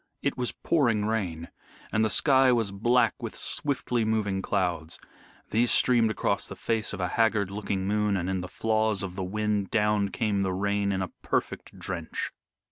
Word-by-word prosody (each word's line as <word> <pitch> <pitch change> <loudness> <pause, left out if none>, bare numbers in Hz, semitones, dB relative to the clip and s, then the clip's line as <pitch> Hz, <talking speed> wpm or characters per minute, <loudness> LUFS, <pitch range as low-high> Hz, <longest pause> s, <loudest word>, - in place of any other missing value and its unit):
It - - 0
was 125 -1 -1
pouring 115 -10 +1
rain, 90 -7 -2 0.4
and 110 - +2
the 110 - +2
sky 130 +4 +5
was 115 -5 +1
black 115 +3 +2
with - - -6
swiftly 125 -4 -1
moving 105 -3 0
clouds. 90 -5 -1 0.5
These 115 +2 +3
streamed 120 -3 +5
across 110 - 0
the - - -8
face 115 -2 -1
of 105 - -6
a 90 - 0
haggard 110 -4 +1
looking 100 -2 -2
moon, 105 -1 +1
and 90 -1 -2
in 95 -1 -1
the 90 - -5
flaws 110 0 0
of 90 -2 -5
the 95 - -3
wind 105 0 -1
down 105 -2 +2
came 105 -1 0
the 95 -1 0
rain 100 +1 0
in 95 -1 -1
a 90 - -5
perfect - - -3
drench. 85 -4 -4
105 Hz, 180 wpm, -27 LUFS, 95-110 Hz, 0.5 s, sky